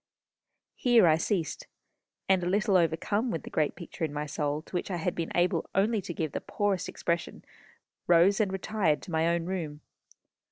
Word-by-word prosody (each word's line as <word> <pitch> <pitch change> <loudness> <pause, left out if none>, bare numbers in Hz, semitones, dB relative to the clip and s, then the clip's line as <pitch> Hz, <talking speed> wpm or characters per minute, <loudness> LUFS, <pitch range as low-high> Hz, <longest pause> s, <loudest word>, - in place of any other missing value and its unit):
Here 240 -6 +4
I 160 -2 +5
ceased, 165 -1 -2 0.6
and 190 -1 +4
a 175 - 0
little 205 +1 +2
overcome 185 - +1
with 165 - -3
the - - -9
great 150 -2 0
picture 170 -1 -8
in 155 - 0
my 150 0 -3
soul 150 +1 -2
to - - -20
which 175 - -2
I 185 - -2
had 175 +1 -1
been 165 -1 -4
able 175 +1 +1
only 210 +3 +2
to 180 - -6
give 155 -3 -2
the - - -4
poorest 200 -3 -1
expression, 170 0 -3 0.6
rose, 175 +3 +5
and 205 -3 +1
retired 190 -5 0
to - - -9
my 160 0 +2
own 170 0 0
room. 165 -5 -4
175 Hz, 190 wpm, -29 LUFS, 160-195 Hz, 0.6 s, I